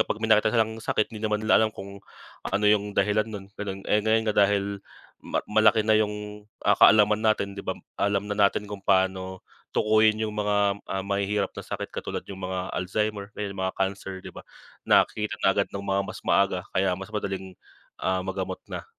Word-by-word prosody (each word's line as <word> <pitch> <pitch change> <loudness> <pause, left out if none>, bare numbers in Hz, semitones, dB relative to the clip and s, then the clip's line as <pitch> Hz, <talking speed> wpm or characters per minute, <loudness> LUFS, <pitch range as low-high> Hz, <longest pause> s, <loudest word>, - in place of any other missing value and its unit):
kapag 110 +1 -2
may 110 - +4
makita 105 0 +4
silang 110 0 0
sakit 110 0 -1
hindi 110 - -7
naman 105 0 -1
nila 110 - +5
alam 110 - +2
kung, 100 +1 -9 0.5
ano 105 +2 0
yung 105 -1 +2
dahilan 105 +2 +2
nun 105 -3 -7 0.2
ganon, 100 -1 -5
eh, 105 - +3
ngayon 110 +1 +2
nga - - -17
dahil, 100 0 -1 0.4
ma - - -2
malaki 110 +1 +4
na 110 - +3
yung, 105 0 -4 0.2
ah, - - +5
kaalaman 105 0 +6
natin 110 -2 +1
'di 100 - -7
ba, - - -4 0.2
alam 100 0 +1
na 105 - -4 0.2
natin 105 - -5
kung 105 -1 -7
paano 95 -1 0 0.3
tukuyin 110 0 +3
yung 110 -1 -2
mga, 100 -1 +1
ah, 95 0 -3
mahihirap 100 0 -1
na - - -7
sakit - - -6
katulad - - -4
yung 95 -1 -9
mga 95 0 -4
Alzheimer 105 +2 -2
ayun 100 -2 -4
mga 95 -1 -2
cancer 95 0 -2
'di - - -8
ba, - - -9 0.5
nakita 105 0 +2
na 95 - +4
agad 100 - +1
ng 100 - -5
mga 95 0 +1
mas - - -8
maaga 95 -2 +2
kaya 95 -1 +2
mas 95 0 -8
madaling, 95 -3 -4 0.5
ah, 95 0 0
magamot 95 0 -4
na. - - -6
100 Hz, 195 wpm, -26 LUFS, 95-105 Hz, 0.5 s, kaalaman